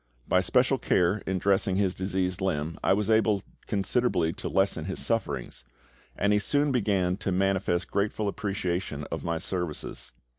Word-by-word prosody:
By 90 - +4
special 125 +7 +2
care 90 +3 +2
in 95 - 0
dressing 95 0 +2
his 95 -2 +1
diseased 95 -1 -2
limb 80 -4 -1
I - - +3
was 100 +1 +2
able 110 -3 +3 0.2
considerably 100 -4 +1
to - - -5
lessen 95 -5 +1
his 95 - -4
sufferings, 115 - -2 0.5
and 100 +1 +2
he 105 - +4
soon 145 +6 +1
began 100 -7 +1
to 100 - -2
manifest 95 -1 0
grateful 105 +1 0
appreciation 95 -6 -2
of - - -3
my 85 0 -1
services. 90 -2 -4
95 Hz, 155 wpm, -28 LUFS, 90-105 Hz, 0.5 s, By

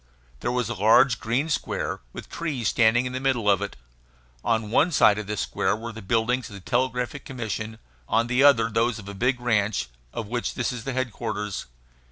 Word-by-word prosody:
There 120 - -1
was 125 -2 0
a 120 - -2
large, 110 +3 +5
green 120 +7 0
square, 150 - -2
with - - -9
trees 140 -10 -2
standing 120 +2 +3
in 125 - -4
the 130 - -2
middle 130 -5 0
of 100 -1 +4
it. 100 - -4 0.7
On 110 -2 0
one 160 +9 +4
side 105 -8 +5
of 105 - -6
this 105 -3 -2
square - - 0
were 115 +2 -6
the 110 0 -9
buildings 115 +5 0
of 100 - -10
the - - -8
Telegraphic 125 +5 -1
Commission, 110 -3 -5 0.3
on 115 +1 +3
the 125 +2 +1
other 125 -6 +6
those 115 +1 +1
of 100 -3 -10
a 100 - -6
big 125 +5 +1
ranch, 105 - 0 0.2
of 115 - -4
which 120 +2 -2
this 125 - -1
is 120 -3 -6
the 135 - -2
headquarters. 110 -5 -3
115 Hz, 205 wpm, -25 LUFS, 105-125 Hz, 0.7 s, other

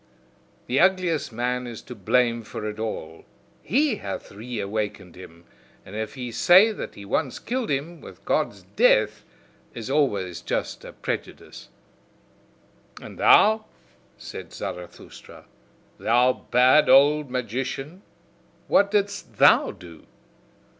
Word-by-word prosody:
The 130 +3 0
ugliest 180 -6 +2
man 125 +2 -2
is 115 -2 -8
to - - -9
blame 120 +2 +1
for 105 -1 -7
it 105 0 -6
all: 80 -7 -5 0.4
he 280 - +1
hath 100 -1 -7
reawakened 105 -4 -5
him. 85 -2 -13 0.4
And 95 - -11
if 110 +3 -5
he 125 -3 -6
say 185 - +6
that 215 - -7
he 100 - -10
once 130 +6 -1
killed 245 0 -3
him, 150 +5 -3
with - - -14
Gods - - -1
DEATH - - +3 0.5
is 115 +2 -6
always 100 - 0
just - - -3
a - - -9
prejudice." - - -7 1.3
"And - - -11
thou," 220 +1 +5 0.5
said - - -9
Zarathustra, 90 -1 -9 0.5
"thou 125 +2 +2
bad 130 +5 +5
old 145 +1 +5
magician, 130 - -4 0.7
what 200 - +4
didst 200 -1 -2
thou - - +5
do! 85 -3 -13
125 Hz, 120 wpm, -24 LUFS, 105-165 Hz, 1.3 s, say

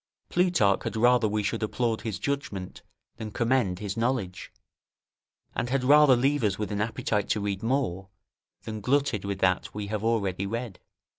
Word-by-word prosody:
Plutarch 175 - +2
had - - -4
rather 120 0 +4
we 105 0 -1
should 100 - -2
applaud 115 +1 -1
his 110 -6 -3
judgment 105 -10 -4 0.4
than 110 -2 -5
commend 115 -4 +1
his 100 -1 -4
knowledge, 115 -6 -2 1.0
and 120 - -2
had 130 0 0
rather 145 0 +7
leave 135 +2 +1
us 100 -2 +1
with 105 0 -3
an 105 0 -1
appetite 105 -1 -1
to 110 - +1
read 100 -1 -2
more, 110 -7 -1 0.5
than 110 -1 -6
glutted 130 -5 +1
with 100 -1 -2
that 95 +1 +1
we 105 -1 -3
have 105 -1 -2
already 100 -4 0
read. 115 -2 -5
110 Hz, 165 wpm, -27 LUFS, 100-125 Hz, 1.0 s, rather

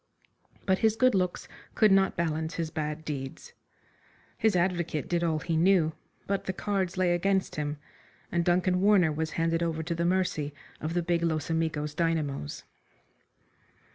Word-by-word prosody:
But 190 -1 +2
his 220 -1 +3
good 255 +2 +4
looks 180 -2 -1 0.3
could 215 -2 +5
not 195 -1 +4
balance 160 -1 -1
his 165 -2 -3
bad 155 0 -4
deeds. 145 - -6 0.8
His 220 -3 +2
advocate 170 -4 0
did 175 -1 0
all 160 -2 +1
he 165 +2 -2
knew, 165 -1 +3 0.3
but 200 0 -2
the 190 - -2
cards 190 -2 -2
lay 180 -1 +3
against 190 +2 0
him, 150 0 -2 0.5
and 170 0 +1
Duncan 180 +1 +2
Warner 195 -5 +5
was 155 +1 -2
handed 165 0 +1
over 160 -1 -1
to 170 +2 -2
the 170 0 -1
mercy 170 -5 0 0.2
of 160 +3 -3
the 175 - +1
big 170 0 +1
Los 160 -2 -1
Amigos 155 -2 -1
dynamos. 155 - -2
170 Hz, 160 wpm, -28 LUFS, 155-185 Hz, 0.8 s, could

